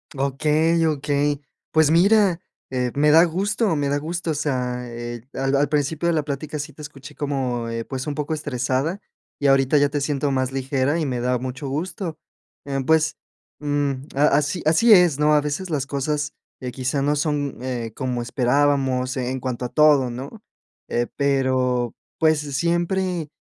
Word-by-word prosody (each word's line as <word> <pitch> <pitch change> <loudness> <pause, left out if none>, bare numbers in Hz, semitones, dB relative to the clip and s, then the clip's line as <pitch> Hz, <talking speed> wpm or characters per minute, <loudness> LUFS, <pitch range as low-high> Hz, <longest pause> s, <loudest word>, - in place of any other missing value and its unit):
Okey, 155 +4 +2
okey. 145 -1 0 0.3
Pues, 155 -1 +4
mira, 190 +1 +4 0.3
eh, 125 -1 -1
me 150 +1 +4
da 165 +2 +7
gusto 200 +3 0
me 145 -1 0
da 145 - +1
gusto, 165 +3 -3
o - - 0
sea, 125 -4 -2
eh, 120 0 -7
al 135 +1 -1
al 140 +1 +3
principio 150 +3 0
de 170 - +2
la 155 -2 +1
plática 150 +1 -4
sí 150 +2 -5
te 150 - -13
escuché 145 -1 -10
como, 130 -5 -2
eh, 115 0 -3
pues, 130 +3 -5
un 145 - -2
poco 150 +2 -2
estresada, 145 +4 -2 0.4
y 145 - 0
ahorita 135 +1 +4
ya 145 0 +3
te 145 0 -1
siento 140 0 -1
más 130 -1 -1
ligera 135 +2 0
y 160 - -1
me 125 -3 -2
da 125 +1 +1
mucho 130 +2 -5
gusto, 165 +3 -4 0.5
em, 135 -2 -3
pues, 160 -1 +2 0.4
mm, 145 -1 0 0.2
a 145 +2 +4
así 150 +4 -1
así 165 +9 +6
es, 175 -7 +5
¿no? 150 0 +4
A 150 - +4
veces 150 +6 -3
las 145 -4 -1
cosas 150 +2 -2 0.3
que 125 - -4
quizás 135 +2 -1
no 145 +1 +1
son, 145 -2 -1
eh, 120 -3 -3
como 125 -2 -2
esperábamos, 130 +1 +1
en 130 0 -2
cuanto 125 -1 -3
a - - -4
todo, 150 -4 +4
¿no?, 135 - -8 0.5
eh, 120 0 -1
pero, 130 -3 +1 0.2
pues, 155 -1 +3
siempre 170 +4 -1
145 Hz, 175 wpm, -22 LUFS, 130-155 Hz, 0.5 s, da